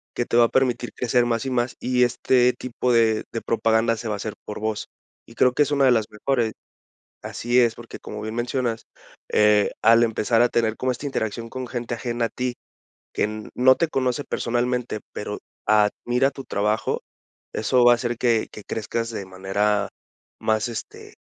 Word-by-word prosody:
que 120 - 0
te 120 - 0
va 120 - +7
a - - -1
permitir 125 -2 0
crecer 125 0 +2
más 115 -1 -1
y 135 - -1
más, 120 -1 -1
y 125 0 +2
este 125 0 +3
tipo 125 0 -2
de 110 -2 +3
de 115 - -2
propaganda 115 0 +1
se 115 - -6
va 105 - -1
a - - -5
hacer 105 +1 -5
por 105 - -6
voz. 110 -1 -2 0.4
Y 115 - -16
creo 125 - +4
que 150 - +4
es 145 - -4
una 140 -1 +2
de 130 - +6
las 110 -3 +2
mejores 115 0 -1 0.7
Así 120 +1 -1
es, 115 -1 +3
porque, 120 -1 -10
como 105 - -8
bien 110 +1 -5
mencionas, 120 -1 -2 0.5
eh, 105 -1 +4
al 115 +1 +6
empezar 115 0 +2
a 120 - +4
tener 115 -2 +1
como 130 - 0
esta 125 - -8
interacción 115 -4 -3
con 130 -1 -5
gente 120 0 -4
ajena 120 0 -2
a - - -2
ti, 125 -1 -3 0.6
que 110 +1 -2
no 130 +1 +6
te 170 - +1
conoce 130 -1 -1
personalmente 120 -1 -1
pero 105 0 -5 0.3
admira 120 +5 +2
tu 135 - -8
trabajo, 105 0 -1 0.5
eso 125 +3 +2
va 120 - +8
a - - +7
hacer 120 0 -3
que 115 -3 +2
que 105 - -10
crezcas 115 +1 -3
de 100 -3 -5
manera 100 +2 0 0.5
más, 110 +1 +1
este, 115 -3 -8
115 Hz, 190 wpm, -23 LUFS, 110-125 Hz, 0.7 s, va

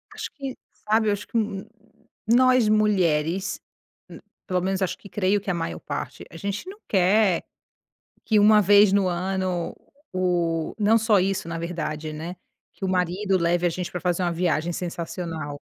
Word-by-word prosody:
Acho - - -5
que, 270 -3 -5 0.3
sabe 220 0 +3
eu - - +3
acho 205 0 -6
que, - - -2 0.9
nós 255 0 +5
mulheres, 190 -3 +1 0.5
hum, - - -10 0.3
pelo 185 -2 0
menos 190 +1 -1
acho 190 - -1
que 200 - -14
creio 200 +1 +1
que 200 - -6
a - - 0
maior 85 - -3
parte, - - -6
a - - -15
gente 200 - -4
não 405 +2 -11
quer, 190 -1 +3 0.8
que 215 - +3
uma 210 +1 +6
vez 205 0 +6
no 200 -2 +3
ano, 185 0 -2 0.4
o 175 -3 0
não 215 +2 +4
só 220 -2 +3
isso 190 -2 -1
na 165 0 -4
verdade, 160 -2 -4
né, 165 +4 -6 0.4
que 195 - -7
o - - 0
marido 185 +2 +1
leve 175 +1 +1
a - - +4
gente 180 +1 -4
pra 180 - -5
fazer 180 +1 0
uma 175 -1 +1
viagem 170 -1 0
sensacional. 165 -4 -5
185 Hz, 170 wpm, -24 LUFS, 170-205 Hz, 0.9 s, uma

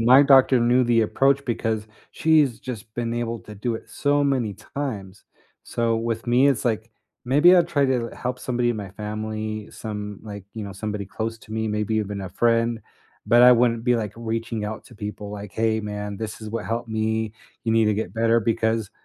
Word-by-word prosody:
my 125 +4 +7
doctor 135 -2 +6
knew 120 +2 +4
the 115 -1 +3
approach 140 +5 +2
because 110 -3 -2 0.3
she's 155 -7 +3
just 120 -5 -6
been 115 -1 -2
able 115 -1 -3
to 105 - -11
do 115 +4 -2
it - - -13
so 145 0 +1
many 125 -7 0 0.2
times. 105 -8 -5 0.4
So 115 -1 0
with 115 0 -3
me, 125 +4 +4
it's 135 - +1
like, 110 -1 -1 0.3
maybe 150 +8 +6
I'd 175 -1 +3
try 145 -4 +2
to 125 -3 0 0.2
help 125 +1 -1
somebody 120 -1 0
in 120 - -2
my 100 -2 -6
family, 110 +1 -4
some, 105 -2 -6
like, 100 -3 -8
you 110 -2 -5
know, 100 - -7
somebody 105 +1 -4
close 115 +3 -4
to 110 - -12
me, 110 0 -1
maybe 105 +1 -1
even 105 -2 -2
a 95 - -5
friend, 115 +3 +1 0.5
but 120 +1 +6
I 125 0 +9
wouldn't 115 -1 +2
be, 125 -1 +3
like, 105 -4 -3
reaching 115 -1 -3
out 110 +1 -5
to 120 - -15
people 105 0 -6
like, 105 -2 -7
"Hey 110 +1 +1
man, 105 -1 -5
this 110 +1 -6
is 110 -1 -7
what 115 - -3
helped 115 +1 -3
me. 110 0 -1 0.3
You 115 - 0
need 115 0 +4
to 105 - +2
get 110 +3 -4
better," 115 0 +3
because 110 -1 0
115 Hz, 205 wpm, -24 LUFS, 105-120 Hz, 0.5 s, I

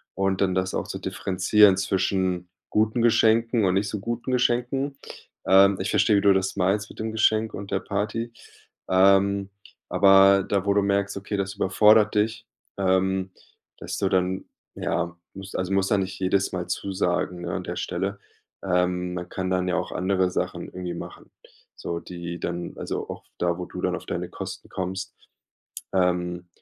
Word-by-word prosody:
und 95 0 0
dann 95 -2 +2
das 95 0 -1
auch - - -2
zu - - -5
differenzieren 95 +1 +3
zwischen 95 -2 0 0.2
guten 110 +2 +1
Geschenken 115 -1 +3
und 90 - +2
nicht 100 +1 0
so 105 - -4
guten 120 +4 -4
Geschenken. 125 +3 0 0.5
Ähm, 95 0 +6
ich - - -2
verstehe, 105 0 +4
wie - - +2
du 100 -1 +5
das 95 0 -1
meinst 100 +2 +1
mit - - -14
dem 110 0 -3
Geschenk 110 0 +2
und 100 0 -8
der 95 - +1
Party. 110 +3 -3 0.6
Ähm, 100 +1 +4 0.4
aber 95 0 +6
da, 100 -1 -1
wo 100 - +3
du 100 - +3
merkst, 100 0 0
okay, 100 +1 -4
das 100 +1 -3
überfordert 105 +2 +4
dich 110 +1 0 0.3
ähm, 95 0 +1 0.5
dass - - -5
du 95 - 0
dann 95 0 0 0.3
ja, 85 -1 -2 0.2
musst 95 0 -9
also, 95 +1 -2
musst 95 0 +1
ja 105 - +4
nicht 95 0 -4
jedes 95 +1 +1
Mal 90 -1 -3
zusagen, 90 -2 -1
ne, 85 0 -4
an 90 -1 -3
der 90 - -5
Stelle. 95 +3 -3 0.4
Ähm, 90 -1 0
man 90 0 -5
kann 95 -1 -3
dann 90 0 0
ja 90 - 0
auch - - -3
andere 95 0 +1
Sachen - - -3
irgendwie 90 -1 -6
machen - - -9 0.5
so, 85 0 -4
die 85 -1 -7
dann 85 0 -4
also, - - -4
auch - - -7 0.2
da, 85 0 0
wo 90 - -4
du - - -7
dann - - 0
auf - - -9
deine - - -3
Kosten - - -7
kommst. 95 0 -4 0.8
Ähm, 90 -1 0
95 Hz, 175 wpm, -25 LUFS, 90-100 Hz, 0.8 s, Ähm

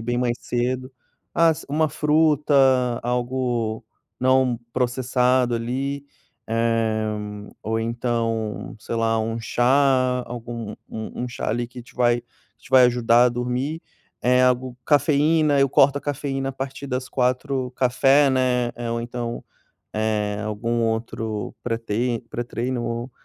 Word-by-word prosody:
bem 120 +2 -2
mais 120 -1 0
cedo. 130 +2 -2 0.4
As 165 -2 +3
uma 155 +2 +1
fruta, 150 0 +2 0.5
algo 120 -2 -1 0.4
não 130 -2 +3
processado, 125 0 +1
ali. 135 +4 -3 0.4
Eh, 115 -1 +1 0.6
ou 110 +1 -1
então, 115 -2 -2
sei 110 - -5
lá, 115 0 +1
um 115 +1 -2
chá, 130 +1 +2
algum 115 -2 -6 0.2
um 110 +2 -6
um 125 - -4
chá 120 - -4
ali 120 +2 -1
que 125 +1 -10
te 120 - -19
vai 120 -1 +2 0.4
te - - -18
vai 130 -1 +7
ajudar 120 -1 +4
a - - +5
dormir. 125 +6 -2 0.4
Eh, 125 +1 +4
algo 125 0 +1
Cafeína, 150 +1 +3
eu 135 0 +4
corto 140 +1 +4
a - - -10
cafeína 135 -2 -2
a - - -10
partir 135 +1 -6
das 130 -1 -3
16h 130 0 0
café, 135 +3 +4
né, 125 -2 +1
eh, 120 -1 -4
ou 115 0 -1
então, 120 0 -5 0.5
eh, 105 -1 -1
algum 115 +2 -1
outro 110 -1 -2
pre-trei 115 0 -1
pré-treino, 120 0 -3
125 Hz, 130 wpm, -23 LUFS, 115-130 Hz, 0.6 s, vai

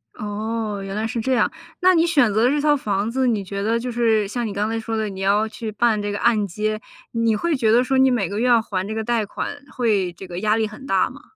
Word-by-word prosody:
哦， 210 0 -3
原 195 +1 -5
来 215 +1 -1
是 230 0 -2
这 260 +3 0
样， 245 - +2 0.3
那 370 0 +6
你 335 0 +3
选 280 -11 +3
择 230 +4 +3
这 295 +1 +1
套 295 -1 +4
房 210 -5 -1
子， 260 0 +1
你 215 -4 +1
觉 200 +1 -5
得 225 +3 +1
就 250 +1 -4
是 225 -3 +2
像 235 +2 -3
你 200 - -5
刚 205 +2 -1
才 225 0 -2
说 225 0 -3
的 215 -1 -1
你 190 -1 -8
要 205 +3 +2
去 220 0 -6
办 215 0 +1
这 205 0 -2
个 205 - -3
按 215 -4 +2
揭， 215 +4 -2 0.3
你 230 -2 +1
会 335 +7 0
觉 225 -4 +2
得 245 +2 +5
说 265 +1 0
你 265 0 +5
每 225 -8 +1
个 205 +2 -4
月 250 - +1
要 235 -2 +5
还 190 -2 -3
这 220 - -4
个 220 - -2
贷 235 -2 0
款 245 - -5 0.2
会 210 -8 +1
这 190 - -10
个 175 0 -5
压 215 +1 +2
力 220 -1 +1
很 215 +6 -11
大 190 -1 +2
吗？ 275 +3 -13
220 Hz, 295 characters per minute, -22 LUFS, 205-240 Hz, 0.3 s, 那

